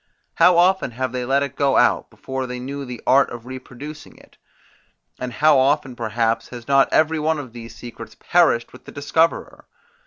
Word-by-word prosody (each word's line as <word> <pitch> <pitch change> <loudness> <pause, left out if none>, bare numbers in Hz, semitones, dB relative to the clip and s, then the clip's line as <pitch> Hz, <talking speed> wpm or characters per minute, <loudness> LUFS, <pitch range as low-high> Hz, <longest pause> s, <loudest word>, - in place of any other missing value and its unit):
How 180 -1 +5
often 185 -2 +3
have 130 -1 -2
they 125 -1 -3
let 135 +2 +2
it 140 - -5
go 140 -1 +2
out, - - +2
before 130 -1 -5
they 125 0 -5
knew 140 +2 -6
the 125 -2 -8
art 140 +1 +4
of 120 -1 -9
reproducing 130 +3 -10
it? - - -20 0.8
And 125 -1 -4
how 150 +3 +4
often 135 -1 +1
perhaps 115 -1 -1
has 120 -2 -10
not 135 -1 +4
every 160 0 +2
one 155 +1 0
of 130 -5 -8
these 115 -1 -10
secrets 115 -2 -10
perished 120 -9 +2
with - - -15
the - - -10
discoverer? 160 +3 -1
130 Hz, 185 wpm, -21 LUFS, 120-145 Hz, 0.8 s, How